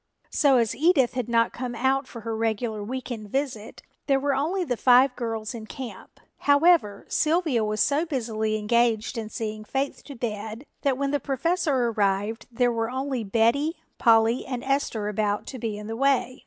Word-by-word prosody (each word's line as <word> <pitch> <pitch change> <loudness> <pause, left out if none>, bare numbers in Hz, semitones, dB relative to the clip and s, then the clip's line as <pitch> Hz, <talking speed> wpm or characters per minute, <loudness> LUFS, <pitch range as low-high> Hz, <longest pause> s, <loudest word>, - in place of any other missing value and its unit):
So 275 -3 +4
as 230 -3 +1
Edith 285 -5 +3
had 250 -3 -3
not 230 0 +2
come 245 -1 -5
out 265 +3 +1
for 235 - -9
her 225 0 -3
regular 220 -1 -1
week 255 +4 -5
end 215 -3 -6
visit 255 -4 -3 0.2
there 275 -1 +3
were 280 +1 0
only 325 +8 0
the 255 -7 -1
five 250 +3 +5
girls 225 -2 -4
in 220 -2 -8
camp. 255 0 -9 0.2
However, 285 - +3
Sylvia 310 -7 +1
was 215 0 -1
so 300 +4 +2
busily 220 -6 -1
engaged 230 +2 +1
in 225 -2 -4
seeing 215 -2 -5
Faith 270 +5 -3
to 280 - -9
bed 220 +1 -5 0.2
that 275 -3 +1
when 275 0 -1
the 290 - +1
Professor 285 0 0
arrived 205 +1 -1
there 245 +1 +2
were 225 -1 -1
only 260 -1 -2
Betty, 235 - +2 0.2
Polly 225 +1 +4
and 250 -2 -5
Esther 270 -6 -1
about 210 0 -1
to 260 - -7
be 220 -2 -3
in 210 - -8
the 225 +1 -4
way. 260 0 +1
240 Hz, 180 wpm, -25 LUFS, 220-275 Hz, 0.2 s, five